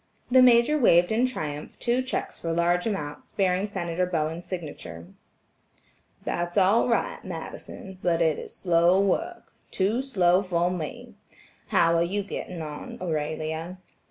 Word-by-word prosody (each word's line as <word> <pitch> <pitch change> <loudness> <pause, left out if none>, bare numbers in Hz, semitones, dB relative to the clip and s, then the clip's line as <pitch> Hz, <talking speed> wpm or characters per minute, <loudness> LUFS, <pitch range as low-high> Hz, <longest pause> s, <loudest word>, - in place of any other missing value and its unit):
The 255 0 +7
Major 250 +4 +5
waved 175 -7 +5
in 235 +4 +3
triumph 150 -11 -5
two 245 +1 +1
checks 255 +1 -4
for 165 - -3
large 175 +3 +1
amounts, 150 -9 -5
bearing 190 0 +1
Senator 180 -3 -2
Bowen's 165 0 -2
signature. 145 - -7 1.1
"That's 175 +1 -3
all 200 +5 +4
right, 480 - -1
Madison, 190 -1 -8
but 170 -2 +1
it 160 -3 +2
is - - -9
slow 175 +1 +3
work–too 220 - -1
slow 185 -9 +3
for 175 -2 0
me. 160 -5 -6 0.5
How 165 0 +3
are 165 - +3
you 195 +4 -1
getting 180 -3 -6
on, 150 -1 -7
Aurelia?" 160 +1 -3
180 Hz, 135 wpm, -26 LUFS, 165-205 Hz, 1.1 s, The